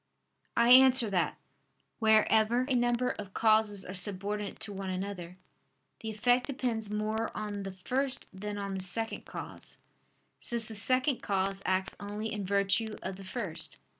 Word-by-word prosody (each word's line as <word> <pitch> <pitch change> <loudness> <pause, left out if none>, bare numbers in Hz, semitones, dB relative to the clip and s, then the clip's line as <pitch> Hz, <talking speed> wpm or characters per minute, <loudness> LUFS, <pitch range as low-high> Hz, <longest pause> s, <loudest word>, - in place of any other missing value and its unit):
I 235 +1 +5
answer 255 -3 +7
that, 180 -3 0 0.6
Wherever 220 +1 +4
a 275 - 0
number 240 0 +2
of 200 -2 -8
causes 215 -3 +3
are 185 - -6
subordinate 200 +2 +1
to 205 - -5
one 195 -1 -5
another, 185 -2 -5 0.6
the 220 - -5
effect 245 +3 +2
depends 240 -6 -2
more 215 +2 -1
on 210 -1 -4
the 195 0 -5
first 255 +8 -2
than 205 +2 -5
on 200 -1 -4
the - - -4
second 225 +5 -2
cause: - - -7 0.6
since 235 -2 0
the 220 - -8
second 255 +5 +1
cause 195 0 0
acts 190 0 0
only 210 +2 -4
in 205 -3 -4
virtue 200 +2 +1
of 190 0 -4
the 195 - -10
first. 190 -4 -5
210 Hz, 155 wpm, -30 LUFS, 195-230 Hz, 0.6 s, answer